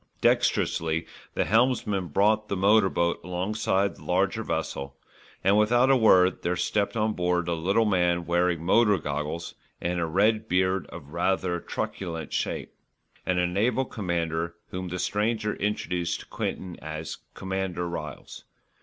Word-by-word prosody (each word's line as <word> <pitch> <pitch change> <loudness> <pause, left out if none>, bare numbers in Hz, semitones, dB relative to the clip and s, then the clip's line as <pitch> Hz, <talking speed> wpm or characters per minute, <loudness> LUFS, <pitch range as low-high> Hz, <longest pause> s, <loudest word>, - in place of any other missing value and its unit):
Dexterously 80 0 +1 0.3
the - - +1
helmsman 110 -5 +2
brought 105 +6 +2
the - - -2
motor 100 +1 +5
boat 85 -1 0
alongside 95 +2 0
the - - -14
larger 95 +4 +1
vessel 70 -7 -3 0.5
and, 100 +3 +4
without 120 +5 +4
a - - +6
word 95 -6 +5
there 90 +1 0
stepped 105 +4 0
on 110 0 +1
board 90 -2 0
a 85 - +1
little 95 +7 +2
man 90 -4 +2
wearing 85 -1 +1
motor 105 +3 +4
goggles 75 +2 -4 0.3
and 90 0 -1
a 85 - 0
red 105 +6 +2
beard 95 +1 +1
of 75 -5 -10
rather 90 0 0
truculent 80 -2 -4
shape, - - -2 0.5
and 90 - +1
a 90 - +3
naval 110 +9 +1
commander 85 -5 -2
whom 90 0 -4
the 90 +1 -4
stranger 105 +2 0
introduced 90 -4 -1
to - - -13
Quinton 90 -2 -4
as 80 0 -6 0.2
Commander 95 -2 -3
Ryles. 75 -4 -7
90 Hz, 145 wpm, -27 LUFS, 85-105 Hz, 0.5 s, a